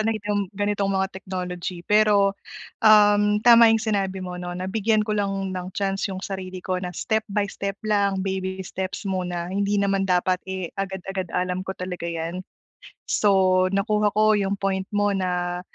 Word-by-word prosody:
ano 220 +1 +1 0.2
yung 205 -2 -1
ganitong 205 -1 0
mga 190 0 +1
technology. 180 -2 -5
Pero, 210 -2 +4 0.5
um, 210 -1 +6
tama 235 -1 +8
yung 225 - +4
sinabi 195 -3 -1
mo 180 -1 -6
'no, 175 0 -5
na 185 +1 -4
bigyan 215 +2 +1
ko 215 - -1
lang 195 -2 -2
ng 180 0 -5
chance 195 -1 -1
yung 190 - -5
sarili 185 -2 -5
ko 185 -1 -1
na 180 - -3
step 220 +5 -1
by 205 0 +1
step 195 0 -5
lang, 200 -2 +1
baby 190 -1 -3
steps 190 +4 -5
muna 180 -2 -2
hindi 200 +1 0
naman 195 -1 +1
dapat, 180 0 +2
eh, 190 -2 -3
agad-agad 190 -1 -4
alam 180 0 -1
ko 190 0 -6
talaga 180 -2 -4
'yan. 170 +2 -4 0.6
So, 185 -2 +3
nakuha 210 +2 +1
ko 215 0 +5
yung 200 -1 0
point 195 -1 -2
mo 205 0 +2
na, 180 -2 -2
195 Hz, 170 wpm, -24 LUFS, 185-205 Hz, 0.6 s, tama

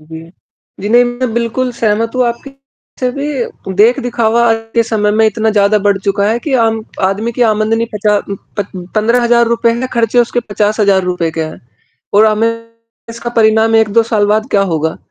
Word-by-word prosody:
जी। 160 +1 -11 0.5
जी, 205 - -3
नहीं 240 +2 +5
मैं 245 0 -3
बिल्कुल 235 +2 -1
सहमत 225 0 -1
हूँ 255 - +2
आपकी 235 +4 -5
बात 275 0 -29
से 255 -1 0
भी 275 -8 -5
देख-दिखावा 235 0 +2
आज 225 - +3 0.2
के 230 - +4
समय 215 -2 0
में 220 +1 +3
इतना 220 +1 0
ज़्यादा 210 0 +3
बढ़ 200 -1 +1
चुका 200 +1 -1
है 225 +2 0
कि 280 +3 -5
आम 225 0 0 0.3
आदमी 215 +5 -3
की 245 - 0
आमदनी 215 +2 0
पचात 210 0 0 0.3
पत 205 -2 -3 0.3
15 230 +3 +2
हज़ार 235 0 +3
रुपए 235 0 +1
है, 240 +2 -3
ख़र्चे 235 0 +1
उसके 240 0 +1
50 210 +1 0
हज़ार 200 -2 +3
रुपए 180 -2 -1
के 160 0 -3
हैं। 155 0 -7 0.5
और 210 +2 +6
हमें 230 +2 0 0.4
इसका 235 +1 -6
परिणाम 225 -1 +3
1-2 220 +1 +3
साल 220 -2 0
बाद 215 +2 +1
क्या 200 - +2
होगा? 160 -4 -2
225 Hz, 190 wpm, -13 LUFS, 205-235 Hz, 0.5 s, और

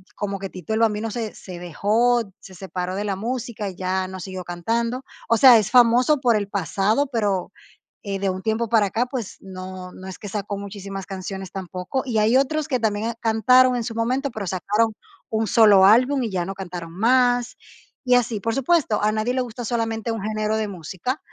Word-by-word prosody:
como 200 -1 -3
que 195 0 -6
Tito 185 +4 -6
El 220 - +1
Bambino 225 0 +1
se 225 -2 -4
se 180 -2 -10
dejó, 215 +8 +2 0.2
se 190 - -14
separó 185 0 -4
de 205 - -2
la 200 -2 -1
música 230 -1 -4
y 185 - -10
ya 185 +1 -1
no 190 0 -8
siguió 185 0 -6
cantando, 230 +9 -2 0.3
o 230 - +4
sea, 250 -1 +9
es 215 0 0
famoso 250 +4 +5
por 245 -4 +3
el 205 -2 -1
pasado, 200 - 0
pero, 205 -6 -1 0.5
eh, 200 -2 -3
de 195 0 0
un 185 0 -4
tiempo 220 +2 -1
para 220 -3 +4
acá, 230 +6 -1
pues, 245 -6 -5
no 185 -1 -8
no 185 - -11
es 190 - -8
que 205 - -7
sacó 200 0 -4
muchísimas 195 -1 -7
canciones 190 -1 -6
tampoco. 185 +6 -4
Y 235 -4 0
hay 220 +4 +4
otros 295 +3 0
que 260 -5 0
también 220 +1 -1
cantaron 250 +3 +4
en 240 - -1
su 225 0 -5
momento 255 +5 0
pero 220 -5 -5
sacaron 210 +5 0 0.4
1 220 0 0
solo 205 -2 +6
álbum 255 +7 +5
y 230 - -2
ya 180 -3 -2
no 195 - -4
cantaron 175 -3 -7
más 245 +4 +2 0.5
y 250 - +3
así. 240 -3 +1
Por 225 +3 -2
supuesto, 275 -4 +1
a 210 - +3
nadie 220 +3 -1
le 255 - 0
gusta 240 0 -6
solamente 225 -1 -2
un 225 -2 -3
género 215 +1 -1
de 215 -1 -1
música 185 - -4
215 Hz, 205 wpm, -23 LUFS, 190-235 Hz, 0.5 s, sea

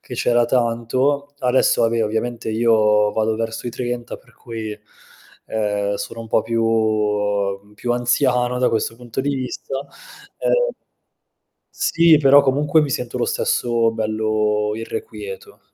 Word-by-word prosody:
che 125 - -9
c'era 120 0 +2
tanto. 130 +4 0
Adesso 125 -2 +2
va 115 - +4
beh 115 0 0
ovviamente 110 +2 -2
io 110 -2 +3
vado 110 0 0
verso 115 +1 -4
i - - -4
30, 120 0 -4
per - - -24
cui, 110 -3 -6 0.7
ehm, 105 -2 -1
sono 100 +3 -6
un 115 - -8
po' 110 - +2
più 105 -3 0
più 120 +3 -2
anziano 125 0 +1
da 125 - +3
questo 115 0 -1
punto 120 +1 -5
di 140 +2 -1
vista. 130 +1 -4 0.6
Ehm, - - +2 1.0
sì, 165 -2 +4
però 140 0 +6
comunque 145 +3 +2
mi 145 - -2
sento 125 -1 -3
lo - - +1
stesso 115 -1 +1
bello 110 -1 0
irrequieto. 445 - -7
115 Hz, 135 wpm, -20 LUFS, 110-130 Hz, 1.0 s, però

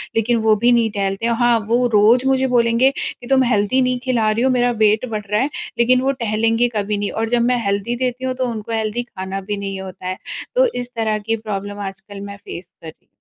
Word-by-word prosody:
लेकिन 230 +1 +2
वो 215 - +6
भी 235 +4 +3
नहीं 235 -2 +3
टहलते 195 +1 -2
हैं। 235 - +2
हाँ 240 -1 +4
वो 245 +2 +3
रोज़ 225 +5 +5
मुझे 265 0 +2
बोलेंगे 240 +1 +3
कि 245 - -5
तुम 265 0 +4
हेल्दी 235 +1 +2
नहीं 255 -1 +1
खिला 235 -4 +2
रही 225 +3 0
हो, 265 - +3
मेरा 245 -1 +2
वेट 215 +3 +3
बढ़ 210 -1 -3
रहा 210 - +2
है 275 - 0 0.3
लेकिन 250 +2 +4
वो 270 +1 +2
टहलेंगे 225 +2 +2
कभी 205 0 -1
नहीं 205 0 -2
और 225 0 -2
जब 240 0 +2
मैं 245 -2 0
हेल्दी 200 +4 -1
देती 250 +1 -3
हूँ 260 - -1
तो 255 0 -1
उनको 225 -1 -6
हेल्दी 220 +1 -1
खाना 195 -4 -6
भी 205 +2 -4
नहीं 195 -1 -4
होता 185 -1 -8
है। 185 0 -3 0.4
तो - - +5
इस 245 0 -5
तरह 220 -2 0
की 225 +2 -1
प्रॉब्लम 205 -2 -5
आजकल 195 +1 -12
मैं 200 0 -8
फ़ेस 175 +1 -8
कर 165 - -10
रही 160 - -13
225 Hz, 235 wpm, -19 LUFS, 205-245 Hz, 0.4 s, वो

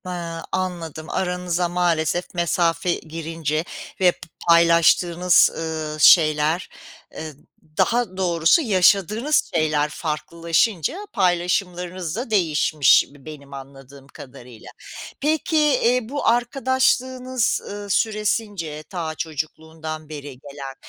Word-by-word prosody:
Hıı, 170 -2 -5
anladım. 170 -4 -4
Aranıza 180 -1 -1
maalesef 175 -1 0
mesafe 170 0 0
girince 160 -1 -4 0.4
ve 180 -2 +5
p - - -20 0.3
paylaştığınız, 170 +1 +4
ııı, 155 -1 -4
şeyler, 155 +1 +4 0.5
ııı, 155 -1 -6 0.4
daha 235 -6 +1
doğrusu 170 - +3
yaşadığınız 210 - +2
şeyler 155 -2 +1
farklılaşınca 165 - -1 0.2
paylaşımlarınız 180 -2 -1
da 240 +2 -4
değişmiş 155 -7 +3
b 140 -1 -19
benim 140 -3 -11
anladığım 135 0 -12
kadarıyla. 125 -4 -13 0.5
Peki, 310 +2 0 0.2
iii, 240 -1 +1
bu 285 +2 -3
arkadaşlığınız, 255 +1 +1
ııı, 205 0 -7
süresince 205 -7 -1
ta 165 -4 -4
çocukluğundan 155 0 -6
beri 145 -4 -9
gelen, 140 -1 -9
170 Hz, 100 wpm, -22 LUFS, 155-190 Hz, 0.5 s, ve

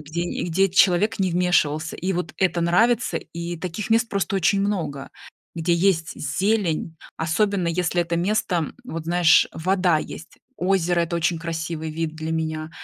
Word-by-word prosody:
где 155 +3 -5
и 175 - -3
где 195 +4 +2
человек 190 +3 +3
не 185 -3 +1
вмешивался. 165 -3 +1
И 190 +2 -2
вот 175 -2 -3
это 180 -2 +1
нравится. 225 +8 +2
И 170 +1 -6
таких 185 +6 -5
мест 225 +1 +3
просто 195 -1 -1
очень 195 +2 +2
много, 175 -9 -2 0.5
где 170 +1 +1
есть 170 -3 +1
зелень, 165 +1 -1 0.2
особенно 185 +3 0
если 175 +1 0
это 170 0 -1
место, 185 +1 0
м, 160 -3 -3
вот 165 -9 -6
знаешь, 170 -1 +4
вода 180 -1 +1
есть. 160 - -9 0.2
Озеро- 180 -2 +1
это 170 0 -1
очень 170 0 0
красивый 160 -1 -4
вид 160 0 -3
для 160 0 -5
меня. 160 -1 -3
170 Hz, 165 wpm, -23 LUFS, 160-190 Hz, 0.5 s, знаешь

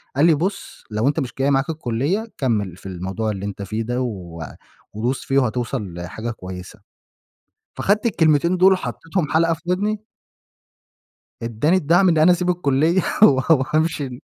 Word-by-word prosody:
قال 145 +4 +4
لي: 165 -2 +5
"بُص 190 +6 -4
لو 110 +5 0
أنت 145 - +1
مش 125 - -4
جاي 140 +1 +2
معاك 135 +2 +1
الكلية، 155 - -1
كمِّل 105 - -1
في - - -19
الموضوع 95 +4 -3
اللي 100 -1 -5
أنت 100 0 -6
فيه 110 +3 -3
ده 120 +2 -2
و 90 -9 -5 0.5
وبُص 120 +5 -2
فيه 135 0 +2
وهتوصل 120 -5 -2
لحاجة 90 +7 -5
كويسة." 90 -4 -9 1.0
فأخدت 210 +3 +1
الكلمتين 170 -4 +3
دول 190 +2 +6
وحطيتهم 175 -3 -3
حلقة 165 +1 +3
في 160 - -9
ودني. 205 +4 0 1.4
ادّاني 115 +10 +1
الدعم 175 +3 +3
إن 165 -2 +3
أنا 160 +4 +6
أسيب 180 0 0
الكلية 165 +1 +2 0.2
و - - +12 0.3
و 130 - +1
هامشي 155 -2 +1
إن 125 -1 -9
135 Hz, 165 wpm, -21 LUFS, 110-170 Hz, 1.4 s, و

